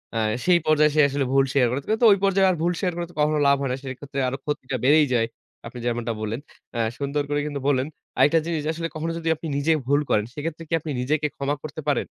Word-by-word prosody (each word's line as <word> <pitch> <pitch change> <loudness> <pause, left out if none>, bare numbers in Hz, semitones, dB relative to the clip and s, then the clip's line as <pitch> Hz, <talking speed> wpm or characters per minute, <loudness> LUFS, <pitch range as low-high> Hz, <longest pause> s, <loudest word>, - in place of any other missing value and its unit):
আ - - 0 0.3
সেই 180 -1 +5
পর্যায়ে 155 -1 +4
সে 155 - +6
আসলে 140 0 -1
ভুল 135 0 +4
শিয়ার 130 -3 +4
করে। 130 +4 -1
কিন্তু 220 +2 +3
ঐ - - +9
পর্যায়ে 195 0 +4
আর 185 - +2
ভুল 175 +2 +1
শিয়ার 180 -3 0
করে 175 - -3
তো - - -22
কখনো 150 0 +2
লাভ 140 - +6
হয় 135 - -1
না। - - 0
সেক্ষেত্রে 135 +1 -6
আরো 130 +2 -2
ক্ষতিটা 135 -3 -3
বেড়েই 150 +3 +5
যায়, 115 -2 +2 0.4
আপনি 120 +1 -9
যেমনটা 120 -1 -1
বললেন। 110 +2 -3 0.3
অ্যা 120 - -1 0.2
সুন্দর 145 +1 -1
করে 145 - 0
কিন্তু 145 -1 -4
বললেন। 135 0 +2 0.3
আরেকটা 145 +5 +5
জিনিস 165 -2 -1
যে - - 0
আসলে 165 +1 -3
কখনো 165 +2 -2
যদি 165 -1 -2
আপনি 160 +1 -7
নিজে 145 +3 +1 0.2
ভুল 145 +1 +3
করেন, 105 0 +2
সেক্ষেত্রে 160 +3 -5
কি 165 - -5
আপনি 155 0 -6
নিজেকে 150 +4 0
ক্ষমা 140 +1 -1
করতে 155 +1 -6
পারেন? 145 - +1
145 Hz, 245 wpm, -24 LUFS, 135-160 Hz, 0.4 s, ঐ